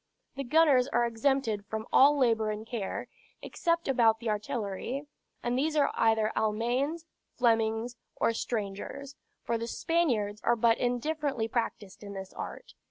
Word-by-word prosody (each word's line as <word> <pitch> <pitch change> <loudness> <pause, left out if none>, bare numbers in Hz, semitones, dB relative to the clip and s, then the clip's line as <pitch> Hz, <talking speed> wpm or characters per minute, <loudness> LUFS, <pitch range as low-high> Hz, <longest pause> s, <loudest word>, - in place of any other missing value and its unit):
The 275 - -3
gunners 275 -2 +4
are 240 -3 +2
exempted 235 -2 0
from 220 0 -4
all 290 +2 +7
labor 225 -5 +2
and 215 +1 -4
care, 225 -4 -4 0.4
except 335 -1 -1
about 235 -4 +4
the 230 -2 -1
artillery; 220 +4 -3 0.4
and 240 0 0
these 305 +4 0
are 290 -2 +3
either 220 -1 +2
Almaines, 245 +9 0 0.3
Flemings, 225 0 +1 0.2
or 230 - +1
strangers; 225 +6 -4 0.3
for 230 -1 -1
the 230 - -4
Spaniards 235 -11 0
are 235 - +3
but 230 0 +3
indifferently 255 0 -1
practiced 220 -4 -3
in 200 -1 -8
this 190 -1 -7
art. - - -8
235 Hz, 145 wpm, -29 LUFS, 220-275 Hz, 0.4 s, all